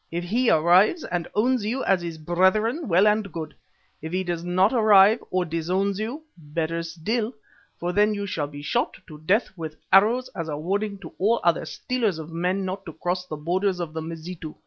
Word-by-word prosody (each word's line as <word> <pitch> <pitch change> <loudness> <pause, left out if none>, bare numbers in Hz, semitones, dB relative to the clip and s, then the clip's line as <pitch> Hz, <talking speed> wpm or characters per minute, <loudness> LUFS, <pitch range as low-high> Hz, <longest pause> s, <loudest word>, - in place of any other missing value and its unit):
If 170 +1 -3
he 230 +8 +1
arrives 180 - +4
and 175 -2 -3
owns 245 +2 +2
you 240 +6 -2
as 190 -2 +2
his 170 -2 -5
brethren, 190 - +1
well 185 +2 +4
and 210 -2 +2
good; 160 -2 -6 0.5
if 160 +1 -6
he 185 +1 0
does 175 -2 -3
not 185 +5 +2
arrive, 215 -1 +6
or 185 -1 0
disowns 185 +5 -1
you 245 +9 -4
better 165 +1 -3
still, 215 +8 -3 0.4
for 175 +1 -2
then 210 +2 +3
you 200 0 -3
shall 155 -6 -2
be 145 0 -10
shot 235 +11 -1
to 155 -3 -12
death 190 +6 +1
with 160 -3 -6 0.2
arrows 225 +6 +5
as 165 -2 -6
a 145 - -3
warning 200 +6 -2
to - - -10
all 225 +5 +3
other 170 -1 +2
stealers 220 +1 -2
of 160 0 -8
men 180 +3 -1
not 190 +1 -4
to 165 - -7
cross 180 +3 -3
the 155 - -5
borders 180 +4 0
of 165 -3 -4
the 160 - -4
Mazitu." 165 0 -7
185 Hz, 200 wpm, -24 LUFS, 165-210 Hz, 0.5 s, arrive